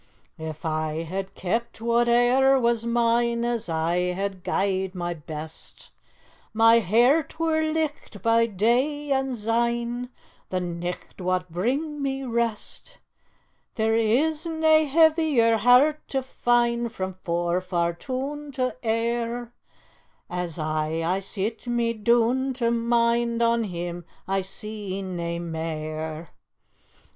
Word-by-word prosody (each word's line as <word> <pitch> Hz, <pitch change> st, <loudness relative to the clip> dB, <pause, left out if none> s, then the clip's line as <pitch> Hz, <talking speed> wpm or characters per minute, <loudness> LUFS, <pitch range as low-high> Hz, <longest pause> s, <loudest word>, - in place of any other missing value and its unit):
"If 160 Hz, +1 st, -7 dB
I 155 Hz, 0 st, -1 dB
had 190 Hz, +3 st, -5 dB
kept 230 Hz, +6 st, -2 dB
whate'er 240 Hz, +3 st, +4 dB
was 235 Hz, -1 st, +1 dB
mine, 235 Hz, 0 st, +2 dB
As 235 Hz, -6 st, -2 dB
I 165 Hz, +2 st, 0 dB, 0.2 s
had 195 Hz, -1 st, -4 dB
gie'd 190 Hz, 0 st, -1 dB
my 175 Hz, -1 st, -2 dB
best, 155 Hz, 0 st, -8 dB, 0.6 s
My 225 Hz, +1 st, +6 dB
hairt 245 Hz, -, +3 dB
were 320 Hz, -1 st, +2 dB
licht 310 Hz, -8 st, -2 dB
by 230 Hz, 0 st, +4 dB
day, 255 Hz, +8 st, 0 dB
and 265 Hz, -2 st, 0 dB
syne 235 Hz, +2 st, -1 dB, 0.4 s
The 185 Hz, -, -1 dB
nicht 175 Hz, +1 st, -5 dB
wad 185 Hz, 0 st, 0 dB
bring 275 Hz, -, -2 dB
me 270 Hz, -1 st, -2 dB
rest; 235 Hz, -, -3 dB, 0.8 s
There 220 Hz, 0 st, +1 dB
is 290 Hz, +9 st, +1 dB
nae 315 Hz, -1 st, +4 dB
heavier 305 Hz, -6 st, +4 dB
hairt 250 Hz, +7 st, +4 dB
to 270 Hz, -1 st, -2 dB
find 240 Hz, -2 st, +1 dB
Frae 190 Hz, -4 st, -4 dB
Forfar 175 Hz, 0 st, 0 dB
toon 275 Hz, +8 st, -5 dB
to 255 Hz, -1 st, -1 dB
Ayr, 235 Hz, +1 st, -1 dB, 0.8 s
As 180 Hz, -2 st, -3 dB
aye 155 Hz, +1 st, -1 dB
I 185 Hz, +3 st, +1 dB
sit 210 Hz, +4 st, -3 dB
me 235 Hz, -1 st, +1 dB
doon 240 Hz, +4 st, +2 dB
to 235 Hz, -2 st, +1 dB
mind 235 Hz, 0 st, +1 dB
On 230 Hz, -1 st, +2 dB
him 175 Hz, -2 st, -5 dB, 0.2 s
I 195 Hz, 0 st, +1 dB
see 195 Hz, 0 st, -5 dB
nae 170 Hz, -2 st, -3 dB
mair. 160 Hz, -1 st, -5 dB
230 Hz, 115 wpm, -25 LUFS, 180-245 Hz, 0.8 s, My